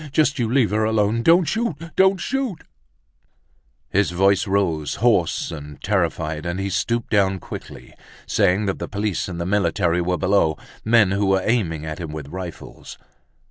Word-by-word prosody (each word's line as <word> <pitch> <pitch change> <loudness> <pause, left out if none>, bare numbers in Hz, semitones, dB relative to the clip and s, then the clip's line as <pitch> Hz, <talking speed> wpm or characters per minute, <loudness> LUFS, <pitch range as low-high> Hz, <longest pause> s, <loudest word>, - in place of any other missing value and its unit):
—just 145 -1 +2
you 115 -2 0
leave 125 -5 +3
her 110 +1 +1
alone—don't 110 - +3
shoot! 225 +2 -1 0.2
Don't 190 0 +4
shoot—" 265 -4 -3 1.3
His 100 +1 +2
voice 95 +3 +2
rose, 85 -7 0
hoarse 100 -9 +1
and 75 -3 -9
terrified 75 -1 -1
and 85 +2 -3
he 100 0 -2
stooped 115 +5 -1
down 95 -3 +2
quickly, - - -10 0.3
saying 95 +4 +2
that 95 - -2
the - - -4
police 105 -1 -2
and 90 -2 -6
the 85 - -2
military 90 -3 +1
were 90 +1 0
below, 80 -3 +2 0.3
men 110 -4 +4
who 100 0 +1
were 95 -1 +2
aiming 85 -10 0
at 80 +1 -5
him 80 -3 -5
with 75 -2 -7
rifles. 90 0 -8
100 Hz, 160 wpm, -22 LUFS, 85-115 Hz, 1.3 s, Don't